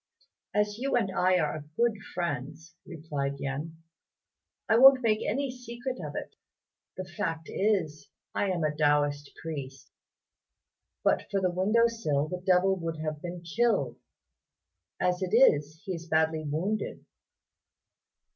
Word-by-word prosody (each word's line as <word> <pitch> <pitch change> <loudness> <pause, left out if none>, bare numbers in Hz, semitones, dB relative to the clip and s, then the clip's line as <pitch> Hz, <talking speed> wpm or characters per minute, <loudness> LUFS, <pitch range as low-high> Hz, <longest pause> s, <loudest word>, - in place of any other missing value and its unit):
"As 210 +1 +1
you 270 +1 0
and 195 -6 +1
I 185 0 +3
are 150 -2 -1
good 235 -2 +3 0.2
friends," 165 -1 -4
replied 145 -5 -4
Yen, 145 +4 -4 0.9
"I - - +4
won't 265 0 +8
make 215 -2 +2
any 270 +4 -1
secret 250 +1 -6
of - - -6
it. - - -6 0.6
The 185 - -4
fact 165 -2 -4
is 165 -8 0 0.2
I 200 - 0
am 175 -3 -1
a 150 -1 0
Taoist 145 -1 +2
priest. 140 -4 -7 1.1
But - - +1
for 200 - +1
the 185 -2 +1
window 210 +6 +3
sill 155 -11 0
the 180 +3 -5
devil 185 +1 +4
would 165 -2 -4
have 155 -1 -4
been 175 0 -6
killed; 230 +7 0 1.0
as 180 +1 +1
it 185 +3 0
is, 155 - +4
he 190 - -3
is 170 -1 -7
badly 160 -1 +1
wounded." 190 +9 -2
175 Hz, 135 wpm, -29 LUFS, 155-210 Hz, 1.1 s, won't